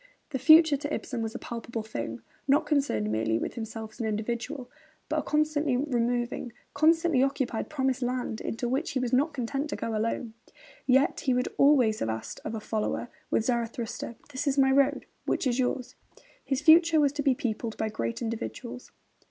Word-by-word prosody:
The 265 - -2
future, 315 0 +7
to 290 +1 -5
Ibsen, 245 -5 -3
was 225 0 -4
a - - -1
palpable 230 -1 -5
thing, 115 - -5 0.2
not 290 +3 +4
concerned 275 - +1
merely 110 +1 +1
with - - -3
himself 220 -1 -6
as - - -18
an 225 - -1
individual, 235 +5 -3 0.4
but 310 0 +1
a - - 0
constantly 300 -3 +1
removing, 245 -3 -1 0.2
continually 320 -1 +3
occupied 270 -4 -1
promised 265 -3 0
land, 245 -2 -2
into 240 +2 -3
which 270 +7 -1
he 260 - 0
was 250 -1 -2
not 285 +5 +3
content 275 +3 -3
to - - -2
go 225 - -3
alone. 225 +1 -2 0.5
Yet 265 +2 +4
he 260 -2 +1
would 250 0 0
always 255 -7 +5
have 115 - -1
asked 110 0 -5
of 220 - -4
a - - -3
follower, 220 +2 -2 0.2
with 220 - +1
Zarathustra: 235 -1 -2 0.2
'This 285 +2 -3
is 280 0 +1
my 265 -1 +5
road; 280 +1 +3 0.2
which - - 0
is 250 0 +1
yours?' 250 0 -1 0.5
His 270 0 -1
future 330 +1 +6
was 285 -2 +4
to 290 - -2
be 270 -2 +3
peopled 225 -2 -3
by 220 - -1
great 115 - -3
individuals. 235 +2 -5
250 Hz, 185 wpm, -28 LUFS, 225-285 Hz, 0.5 s, future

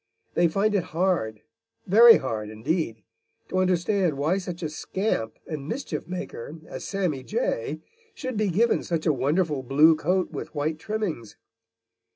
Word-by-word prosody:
They 175 - +4
find 200 +6 +1
it 195 -4 +1
hard, 170 - 0 0.4
very 230 +5 +8
hard 110 -5 -4
indeed, 115 - -2 0.5
to 185 - 0
understand 185 -2 +1
why 160 +7 +1
such 180 -2 -6
a 155 - -1
scamp 155 - -2
and 150 -2 -6
mischiefmaker 170 - -5
as - - -7
Sammy 180 -9 -1
Jay - - -2 0.3
should 255 -2 -4
be 215 -1 +1
given 225 +7 +2
such 165 -2 -2
a 155 - +4
wonderful 145 +2 0
blue 150 +5 +5
coat 180 +4 0
with - - -7
white 155 +2 -1
trimmings. 180 - -4
170 Hz, 145 wpm, -26 LUFS, 145-195 Hz, 0.5 s, very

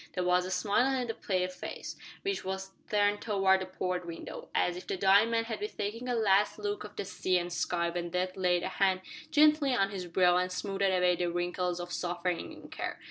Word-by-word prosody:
There 180 - -1
was 180 0 +3
a - - -5
smile 245 +8 +2
on 250 - -1
the 225 - -3
pale 185 -4 -1
face, 185 0 -7 0.3
which 395 0 -1
was 190 0 -4 0.2
turned 205 0 +2
towards 195 -3 +3
the 185 - -4
port 180 -1 -2
window, 170 -1 -8
as 175 - +2
if 180 - -9
the - - -2
dying 200 +4 +5
man 230 0 +1
had 225 0 -4
been 420 +1 -3
taking 230 +5 -3
a 245 - +1
last 210 -1 +3
look 205 -1 -3
of 210 0 -10
the - - -3
sea 185 -1 0
and 175 0 -3
sky 170 0 0
when 175 0 -3
Death 180 +1 -1
laid 180 -2 +2
a - - -1
hand 190 -1 +2 0.3
gently 300 -3 +4
on 195 -3 +2
his 185 -3 -5
brow 180 0 +4
and 180 0 0
smoothed 195 +1 -3
away 180 -2 +3
the 175 0 -1
wrinkles 175 0 -1
of 175 0 -5
suffering 175 -1 -2
and - - -12
care. - - -4
190 Hz, 225 wpm, -31 LUFS, 180-210 Hz, 0.3 s, dying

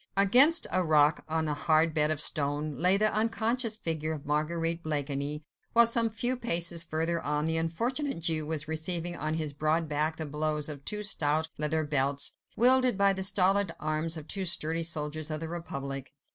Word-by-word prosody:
Against 255 - +7
a 185 - +2
rock, 150 -2 +2
on 160 0 -1
a 150 - -1
hard 155 +2 +1
bed 150 -1 +1
of 155 -2 -1
stone, 145 -1 0
lay 185 +2 +3
the 215 +1 +1
unconscious 225 +1 0
figure 160 -5 -3
of 150 -3 -8
Marguerite 165 +3 -1
Blakeney, 145 -1 -4 0.3
while 235 0 +7
some 230 0 +2
few 240 +3 -1
paces 170 -8 +1
further 165 +1 -2
on, 150 +1 -2
the 160 0 0
unfortunate 235 - -2
Jew 160 -2 0
was 155 -1 -2
receiving 170 +2 -1
on 155 0 -3
his 155 -3 -3
broad 155 +3 -1
back 150 +2 -2
the 160 - -5
blows 150 0 -1
of 145 -2 -8
two 210 0 -3
stout 160 -5 0
leather 155 +1 0
belts, 140 -1 0 0.2
wielded 255 -2 +4
by 200 0 +3
the 190 0 -4
stolid 190 -1 +3
arms 155 +2 -2
of 155 -1 -10
two 195 - -2
sturdy 165 -2 -1
soldiers 155 -1 -3
of 155 0 -3
the 165 - -6
Republic. 140 -5 -6
160 Hz, 185 wpm, -28 LUFS, 150-190 Hz, 0.3 s, Against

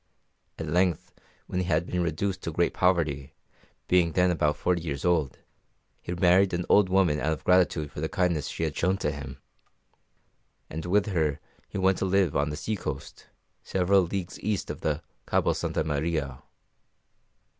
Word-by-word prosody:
At 80 - -4
length 90 +2 0 0.3
when 90 - -3
he 90 - 0
had 85 -1 +1
been 90 0 -2
reduced 90 +3 -1
to 85 - -4
great 85 +2 +1
poverty, 75 -6 0 0.5
being 85 -3 +3
then 90 0 +3
about 75 -3 +1
forty 90 +1 0
years 70 -2 -4
old, 80 -7 +1 0.6
he - - -6
married 90 +1 +4
an 90 0 -2
old 100 -2 +5
woman 90 -6 +3
out 80 - 0
of 80 - -7
gratitude 90 -5 +2
for - - -7
the 80 - -1
kindness 90 -5 0
she - - -4
had - - -2
shown 95 +3 +1
to 75 - -1
him; 70 -2 -7 1.3
and 80 +2 -5
with 100 +3 +3
her 80 -7 0 0.3
he - - -5
went 95 0 +2
to - - 0
live 95 -4 +2
on 75 +1 +1
the 75 - -4
sea 110 +5 -2
coast, 75 -7 -7 0.3
several 95 +1 +2
leagues 90 +1 -4
east 105 -2 -2
of - - -8 0.5
Cabo - - +2
Santa - - -1
Maria. 75 -3 -2
85 Hz, 170 wpm, -27 LUFS, 75-95 Hz, 1.3 s, old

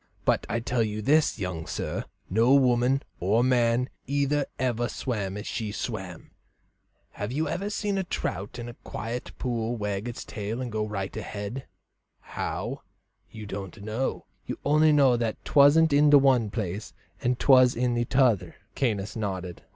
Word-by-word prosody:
But - - +2
I 115 - 0
tell 120 0 -1
you 105 -1 -2
this, 150 +4 +3
young 90 -4 -4
sir, - - -3 0.2
no 115 +7 +4
woman 130 0 +3 0.2
or 105 +6 +2
man 125 -1 +2 0.2
either 145 +1 +1
ever 120 -2 0
swam 105 -6 -3
as 105 - -6
she 110 -3 -3
swam. 95 -6 -6 0.8
Have 105 +2 -5
you 155 +4 -1 0.2
seen 205 -2 -1
a - - 0
trout 105 - -4
in 120 0 -6
a 120 - -7
quiet 115 +1 -6
pool 120 -2 -2
wag 105 +1 -3
its 120 - -6
tail 105 +3 -4
and 125 -2 -4
go 110 0 -1
right 100 -2 -4
ahead 105 +6 -5 0.5
how, - - -4 0.5
you 110 -1 -9
didn't 100 +1 -7
know; 110 +5 -2 0.2
you - - -4
only 155 +2 +5
knew 135 -4 +5
that 115 -2 -1
'twasn't 145 +2 +5
in 145 +1 +5
the 145 - +9
one 130 -5 +4
place 100 -2 -4 0.3
and 125 0 +1
'twas 130 -2 +6
in 120 -1 +1
t'other?" 125 -6 +2 0.2
Caius 105 -6 -1
nodded. 95 -5 -4
120 Hz, 160 wpm, -27 LUFS, 105-135 Hz, 0.8 s, the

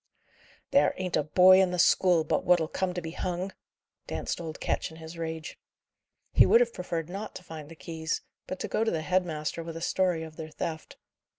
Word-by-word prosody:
"There 280 - +4
ain't 185 -2 -2
a - - +3
boy 185 +5 +7
in 190 - +3
the 180 - -2
school 175 -1 +4
but 155 - 0
what'll 175 -3 +4
come 185 +3 -1
to 175 - -3
be 160 - -5
hung!" 180 +2 -3 0.6
danced - - -3
old 160 -2 -6
Ketch - - -1
in 160 - -13
his 160 +1 -9
rage. 160 -1 -5 0.7
He - - +8
would 230 - +7
have 240 -1 +2
preferred 170 -3 -3
not 200 +4 -6
to - - -8
find 155 -3 -9
the 165 - -11
keys; 160 0 -3 0.3
but 185 - -5
to - - -2
go 220 - 0
to 225 - +1
the 160 -5 -2
head 185 +1 +1
master 155 0 -3
with 165 0 -6
a - - -7
story 180 -3 +1
of 160 -1 -10
their 155 -1 -6
theft. 160 +1 -5
170 Hz, 215 wpm, -28 LUFS, 160-185 Hz, 0.7 s, He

